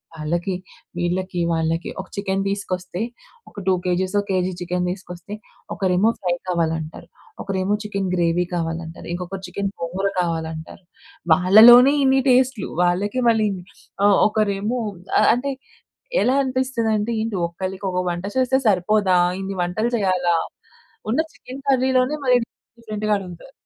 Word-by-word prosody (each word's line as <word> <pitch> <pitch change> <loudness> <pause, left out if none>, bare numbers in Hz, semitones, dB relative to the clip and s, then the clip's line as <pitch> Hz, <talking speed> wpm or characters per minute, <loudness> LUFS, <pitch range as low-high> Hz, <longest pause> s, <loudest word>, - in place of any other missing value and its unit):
వాళ్ళకి 170 +5 -2 0.4
వీళ్ళకి 180 +1 -2
వాళ్ళకి 165 +1 -1
ఒక 190 - -13
చికెన్ 195 -1 -1
తీసుకొస్తే 185 -1 -4 0.5
ఒక - - -25
2 190 - +5
కేజీసో, 185 +3 0
కేజీ 185 -1 0
చికెన్ 180 +1 -1
తీసుకొస్తే 180 +1 -8 0.4
ఒకరేమో 190 +3 +2
ఫ్రై 175 -2 0
కావాలంటారు. 165 -2 -2 0.3
ఒకరేమో 195 +1 -1
చికెన్ 200 -3 -3
గ్రేవీ 175 0 +1
కావాలంటారు. 165 0 -4
ఇంకొకరు 180 +2 -6
చికెన్ 195 +2 -3
గోంగూర 190 +4 -1
కావాలంటారు. 160 +1 -4 0.5
వాళ్ళలోనే 230 - +8
ఇన్ని 265 0 +4
టేస్ట్‌లు. 255 -4 +2
వాళ్ళకే 200 +8 0
మళ్ళీ 220 -2 +3 0.6
ఆహ్, 205 -1 +5
ఒకరేమో 215 +2 -1 0.4
ఆహ్, - - +5
అంటే 275 +3 -2 0.7
ఎలా 255 - +2
అనిపిస్తుందంటే 235 -4 -1
ఏంటి? 220 -3 -2
ఒకళ్ళకి 190 +3 -6
ఒక 180 - -2
వంట 175 +2 -4
చేస్తే 260 0 +3
సరిపోదా 195 -1 +3 0.2
ఇన్ని 195 0 -4
వంటలు 215 +7 -1
చేయాలా? 180 -4 +1 0.8
ఉన్న 260 - +2
చికెన్ 265 +2 -10
కర్రీలోనే 260 +2 +2
మళ్ళీ 250 -1 +5
డిఫరెంట్ 235 - -56
డిఫరెంట్‌గా 215 -1 -3
అడుగుతారు. 185 +7 -10
195 Hz, 125 wpm, -22 LUFS, 175-220 Hz, 0.8 s, వాళ్ళలోనే